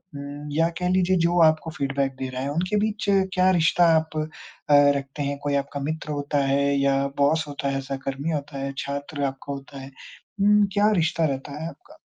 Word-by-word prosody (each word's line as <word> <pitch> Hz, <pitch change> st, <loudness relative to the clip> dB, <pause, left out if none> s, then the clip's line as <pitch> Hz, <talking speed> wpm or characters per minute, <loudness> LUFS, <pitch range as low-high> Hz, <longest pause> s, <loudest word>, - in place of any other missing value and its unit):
उम, 145 Hz, +1 st, -7 dB
या 165 Hz, +3 st, +2 dB
कह 180 Hz, 0 st, 0 dB
लीजिए 185 Hz, 0 st, +2 dB
जो 175 Hz, +1 st, +2 dB
आपको 155 Hz, +1 st, +3 dB
फ़ीडबैक 135 Hz, -2 st, -2 dB
दे 130 Hz, -1 st, -3 dB
रहा 130 Hz, 0 st, -5 dB
है 140 Hz, -, -2 dB
उनके 180 Hz, +7 st, -1 dB
बीच 215 Hz, -1 st, -3 dB, 0.3 s
क्या 185 Hz, 0 st, +4 dB
रिश्ता 170 Hz, +2 st, +4 dB
आप 160 Hz, 0 st, -3 dB
अ, 155 Hz, 0 st, -1 dB, 0.7 s
रखते 140 Hz, +1 st, -6 dB
हैं 140 Hz, 0 st, -2 dB
कोई 145 Hz, -1 st, 0 dB
आपका 140 Hz, 0 st, -2 dB
मित्र 155 Hz, -1 st, -4 dB
होता 145 Hz, 0 st, -2 dB
है 140 Hz, +1 st, +2 dB, 0.2 s
या 140 Hz, 0 st, +2 dB, 0.2 s
बॉस 155 Hz, +3 st, +2 dB
होता 140 Hz, -1 st, -3 dB
है 135 Hz, -, -1 dB
सहकर्मी 135 Hz, +3 st, -4 dB
होता 145 Hz, -2 st, -4 dB
है 135 Hz, 0 st, -3 dB
छात्र 140 Hz, +1 st, -4 dB
आपका 135 Hz, +1 st, -5 dB
होता 140 Hz, 0 st, -9 dB
है? 135 Hz, +1 st, -10 dB, 0.5 s
हुँ, 205 Hz, 0 st, +5 dB
क्या 205 Hz, +1 st, +4 dB
रिश्ता 165 Hz, 0 st, +1 dB
रहता 140 Hz, +1 st, -4 dB
है -, -, -3 dB
आपका? 365 Hz, -, -16 dB
145 Hz, 200 wpm, -24 LUFS, 140-165 Hz, 0.7 s, हुँ